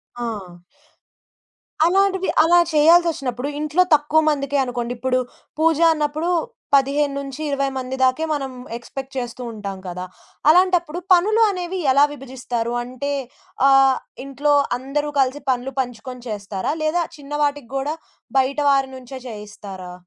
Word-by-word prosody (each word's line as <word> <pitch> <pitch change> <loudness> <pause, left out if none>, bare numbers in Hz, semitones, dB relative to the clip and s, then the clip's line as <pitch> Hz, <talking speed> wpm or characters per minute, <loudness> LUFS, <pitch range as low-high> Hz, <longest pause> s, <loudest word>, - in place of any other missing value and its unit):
ఆ! 210 -7 -5 1.3
అలాంటివి 380 +1 +2
అలా 345 +2 +5
చేయాల్సొచ్చినప్పుడు 300 -5 +3
ఇంట్లో 305 +4 +2
తక్కువ 295 +2 +2
మందికే 280 -1 0
అనుకోండి. 245 -1 -3
ఇప్పుడు 255 +1 0 0.4
పూజ 325 -1 +3 0.2
అన్నప్పుడు 305 +2 -1 0.5
15-20 280 0 0
మంది 260 0 -4
దాకే 260 +5 +2
మనం 275 -2 -3 0.3
ఎక్స్‌పె‌క్ట్ 265 +3 -8
చేస్తూ 245 0 -4
ఉంటాం 200 -3 -6
కదా! 180 +1 -5 0.4
అలాంటప్పుడు 350 -1 +3
పనులు 425 +6 +3
అనేవి 365 0 -4
ఎలా 280 +2 +5
విభజిస్తారు? 245 -4 -4
అంటే 255 +3 -5 0.6
ఆహ్, 270 -1 +6 0.3
ఇంట్లో 285 +2 0 0.3
అందరూ 290 +3 -2
కలిసి 270 +2 +1
పనులు 255 +1 -3
పంచుకొని 250 0 -5
చేస్తారా 205 +4 -3
లేదా 315 +3 +1
చిన్నవాటికి 290 -2 -2
గూడా 290 +4 -2 0.4
బయట 270 +3 0
వారి 270 -1 +2
నుంచే 260 +1 -9
చేయిస్తారా? 205 -4 -9
275 Hz, 115 wpm, -21 LUFS, 250-300 Hz, 1.3 s, ఆహ్